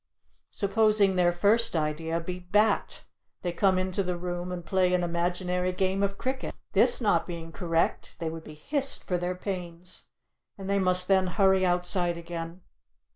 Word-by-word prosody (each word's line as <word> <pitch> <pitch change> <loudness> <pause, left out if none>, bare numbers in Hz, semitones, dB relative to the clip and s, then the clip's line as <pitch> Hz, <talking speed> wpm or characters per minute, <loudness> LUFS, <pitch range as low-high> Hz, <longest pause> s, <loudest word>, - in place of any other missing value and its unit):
Supposing 210 -1 +2
their 175 -1 +3
first 210 +4 +2
idea 160 +1 -1
be 180 +2 -6
"Bat," 205 +4 +1 0.4
they 175 - -1
come 190 +2 +2
into 185 +1 -1
the 180 -2 -2
room 175 0 -4
and 175 -2 -6
play 185 -1 +2
an 180 - 0
imaginary 180 +1 -1
game 190 +1 -1
of 200 0 -1
cricket. 260 +1 -4 0.2
This 480 - +4
not 205 -7 +2
being 165 -2 -7
correct, 165 -1 -1
they 165 - -4
would 160 0 -6
be 155 - -11
hissed 275 - +1
for 180 -1 -2
their 180 +1 -2
pains, 180 -2 -5 0.5
and 195 -1 -8
they 200 0 +1
must 180 -1 +4
then 190 -1 +3
hurry 190 +1 +3
outside 175 -1 +1
again. 170 +1 -7
180 Hz, 165 wpm, -27 LUFS, 175-195 Hz, 0.5 s, This